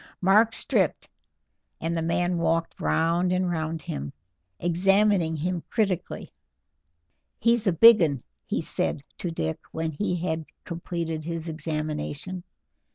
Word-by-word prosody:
Mark 210 Hz, +5 st, +5 dB
stripped, -, -, +1 dB, 0.7 s
and 165 Hz, +1 st, -2 dB
the 165 Hz, -, 0 dB
man 175 Hz, +1 st, 0 dB
walked 165 Hz, 0 st, 0 dB
round 165 Hz, -, +2 dB
and 180 Hz, -1 st, +1 dB
round 160 Hz, -1 st, -3 dB
him, 70 Hz, 0 st, -5 dB, 0.5 s
examining 185 Hz, 0 st, +3 dB
him 175 Hz, +3 st, -2 dB
critically. 195 Hz, -6 st, -2 dB, 1.0 s
"He's 230 Hz, -1 st, +2 dB
a -, -, +5 dB
big 220 Hz, +5 st, +8 dB
'un," 150 Hz, -4 st, +2 dB, 0.3 s
he -, -, -1 dB
said 140 Hz, -, -2 dB, 0.2 s
to 175 Hz, -, -2 dB
Dick 80 Hz, -, -3 dB
when 160 Hz, 0 st, -2 dB
he 180 Hz, +4 st, -1 dB
had 160 Hz, -2 st, -2 dB, 0.2 s
completed 170 Hz, -2 st, -4 dB
his 165 Hz, 0 st, -4 dB
examination. 155 Hz, +2 st, -4 dB
170 Hz, 125 wpm, -26 LUFS, 160-185 Hz, 1.0 s, big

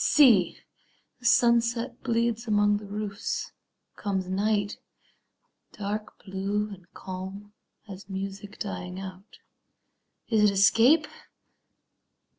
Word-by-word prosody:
See, 235 Hz, -, +5 dB, 0.6 s
The 245 Hz, -, -1 dB
sunset 235 Hz, +1 st, +3 dB
bleeds 235 Hz, -1 st, 0 dB
among 205 Hz, -1 st, +3 dB
the 205 Hz, 0 st, -9 dB
roofs; 205 Hz, 0 st, -4 dB, 0.4 s
comes 190 Hz, -3 st, -2 dB
night, 205 Hz, +2 st, 0 dB, 0.9 s
Dark 210 Hz, +1 st, -5 dB
blue 200 Hz, +2 st, -2 dB
and 185 Hz, -3 st, -12 dB
calm 190 Hz, +2 st, -8 dB, 0.3 s
as 195 Hz, 0 st, -10 dB
music 195 Hz, +2 st, -6 dB
dying 180 Hz, -3 st, -5 dB
out. 190 Hz, +1 st, -10 dB, 0.9 s
Is 220 Hz, -3 st, +2 dB
it -, -, +6 dB
escape? 230 Hz, +10 st, +5 dB
205 Hz, 95 wpm, -27 LUFS, 195-230 Hz, 0.9 s, it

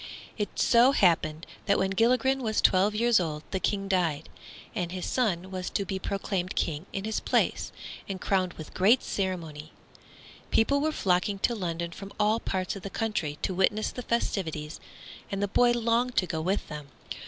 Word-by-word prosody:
It 210 Hz, -2 st, -4 dB
so 245 Hz, +3 st, +5 dB
happened 165 Hz, -, +2 dB, 0.2 s
that 200 Hz, -, +4 dB
when 190 Hz, -, +1 dB
Gilligren 255 Hz, +6 st, +2 dB
was 220 Hz, -3 st, 0 dB
twelve 195 Hz, +3 st, +4 dB
years 235 Hz, 0 st, +4 dB
old 155 Hz, -3 st, -3 dB
the 190 Hz, -, -1 dB
King 195 Hz, +1 st, -1 dB
died, 170 Hz, -6 st, 0 dB, 0.4 s
and 180 Hz, -5 st, -2 dB
his 185 Hz, -1 st, -4 dB
son 190 Hz, -7 st, 0 dB
was 185 Hz, -1 st, -3 dB
to 200 Hz, -, -1 dB
be 190 Hz, 0 st, -3 dB
proclaimed 195 Hz, -1 st, -2 dB
King 160 Hz, +3 st, -2 dB
in 195 Hz, -, -4 dB
his 220 Hz, 0 st, -1 dB
place, -, -, 0 dB, 0.4 s
and 190 Hz, -1 st, -3 dB
crowned 185 Hz, -1 st, 0 dB
with 155 Hz, -, -10 dB
great 215 Hz, +7 st, +4 dB
ceremony. 165 Hz, -6 st, -4 dB, 0.8 s
People 280 Hz, +5 st, +3 dB
were 310 Hz, +1 st, +1 dB
flocking 195 Hz, -4 st, +1 dB
to 240 Hz, -, +2 dB
London 170 Hz, -5 st, -3 dB
from 195 Hz, +3 st, -9 dB
all 210 Hz, +2 st, +3 dB
parts 190 Hz, -3 st, -2 dB
of 195 Hz, -, -7 dB
the 200 Hz, -, -6 dB
country, 195 Hz, -10 st, -2 dB
to 190 Hz, -, 0 dB
witness 205 Hz, +4 st, +1 dB
the 250 Hz, -, -6 dB
festivities, 165 Hz, -10 st, -2 dB, 0.5 s
and 195 Hz, -, -2 dB
the 205 Hz, -, +1 dB
boy 240 Hz, +4 st, +4 dB
longed 240 Hz, +1 st, +1 dB
to 185 Hz, -, +4 dB
go 160 Hz, -2 st, -3 dB
with 190 Hz, +5 st, -1 dB
them. 150 Hz, -1 st, -7 dB
195 Hz, 180 wpm, -28 LUFS, 175-220 Hz, 0.8 s, so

